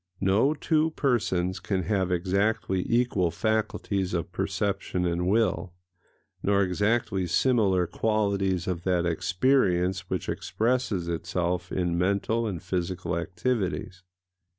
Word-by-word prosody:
No 105 +10 +3
two 155 +1 +1
persons 95 -9 0
can 95 -3 -1
have 95 -2 0
exactly 95 +1 0
equal 120 -7 +2
faculties 100 -1 -1
of 85 +1 -3
perception 95 0 -1
and 90 +1 0
will, 100 -4 +1 0.7
nor 100 0 +3
exactly 95 0 0
similar 95 -2 +2
qualities 100 -3 0
of 90 -2 -2
that 90 -1 +1
experience 90 - +1
which 95 - -2
expresses 115 -6 -1
itself 85 +1 -2
in 85 -2 0
mental 100 +5 +1
and 90 -5 -4
physical 90 0 -2
activities. 90 +1 -2
95 Hz, 110 wpm, -27 LUFS, 90-110 Hz, 0.7 s, No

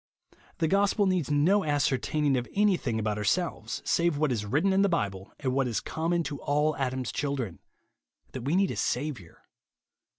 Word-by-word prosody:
The 165 - +1
gospel 200 +3 +2
needs 185 -6 0
no 170 +8 +3
ascertaining 145 0 +1
of 125 -1 -2
anything 185 - +2
about 105 -1 -1
ourselves, 170 - -1
save 170 -3 +2
what 150 -2 +1
is 105 -4 -2
written 160 - +2
in 195 - +3
the 200 - +3
Bible, 100 - -2
and 130 -3 -1
what 135 -1 +1
is 115 -4 -1
common 170 +2 -1
to 145 -3 -5
all 150 +1 +1
Adam's 130 -2 -2
children, 135 - -3 0.4
— - - -42
that 130 - -6
we 140 +7 0
need 195 0 +2
a - - -4
Saviour. 125 - -3
145 Hz, 175 wpm, -28 LUFS, 125-170 Hz, 0.4 s, no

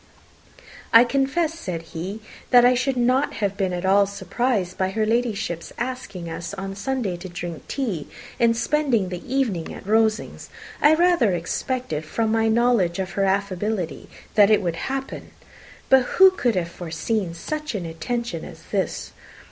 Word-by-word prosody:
"I 230 +1 +9
confess," 275 +6 0
said 180 - -5
he, 190 +7 -5 0.3
"that 245 -1 +7
I 250 - +6
should 255 +1 0
not 255 +3 +2
have 200 -2 -1
been 195 -2 -1
at 180 +1 -3
all 200 +1 +4
surprised 200 0 -1
by 190 0 0
her 215 +3 0
Ladyship's 220 -7 -1
asking 240 -8 -5
us 170 +4 -5
on 195 0 -5
Sunday 215 -2 -2
to 185 +2 -8
drink 175 -2 -7
tea 215 - -3 0.3
and 230 -1 +3
spend 290 +3 0 0.2
the 180 -1 -5
evening 230 -12 0
at - - -10
Rosings. 220 +1 0 0.3
I 300 +2 +6
rather 335 - +3
expected, 175 - -2
from 220 +8 -1
my 225 0 +2
knowledge 225 -6 +2
of 190 -1 -3
her 195 - 0
affability, 195 -1 -2 0.2
that 205 -1 +6
it 210 -2 +4
would 170 -2 -1
happen. 270 0 -5 0.6
But 265 0 +6 0.2
who 380 0 +9
could 245 - 0
have 170 -2 -1
foreseen 175 +2 -3
such 305 - -4
an 185 -4 -3
attention 165 +3 -4
as - - -11
this? - - -2
215 Hz, 160 wpm, -23 LUFS, 180-245 Hz, 0.6 s, I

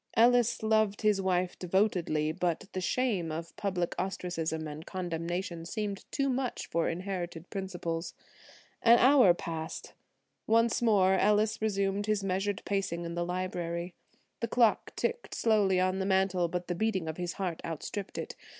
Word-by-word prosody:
Ellis 240 0 +4
loved 220 -1 +2
his 210 -2 +3
wife 180 -1 0
devotedly, 180 -5 +1
but 175 +1 -1
the 185 - -2
shame 195 -6 0
of 165 +2 -6
public 180 -4 -1
ostracism 165 -4 -2
and 150 +1 -7
condemnation 175 -1 -4
seemed 200 +2 -4
too 275 - 0
much 255 -1 -1
for 165 0 0
inherited 175 -1 -5
principles. 175 -4 -4 0.7
An 235 0 +7
hour 250 -8 +6
passed. 160 -2 -6 0.5
Once 230 +1 +3
more 200 -5 +4
Ellis 210 +3 +2
resumed 200 -1 0
his 210 -2 +1
measured 195 +1 -1
pacing 190 -4 -1
in 170 - -4
the 175 0 -1
library. 175 -1 -3 0.5
The 230 - -1
clock 230 -1 +2
ticked 475 +1 -2
slowly 205 -5 +3
on 185 +1 +1
the 190 - -1
mantel, 190 -2 +2
but 180 +1 -4
the 175 - -1
beating 190 -2 -1
of 160 - -4
his 175 -1 -3
heart 180 -4 -3
outstripped 175 +5 -5
it. - - -5
190 Hz, 150 wpm, -30 LUFS, 170-210 Hz, 0.7 s, An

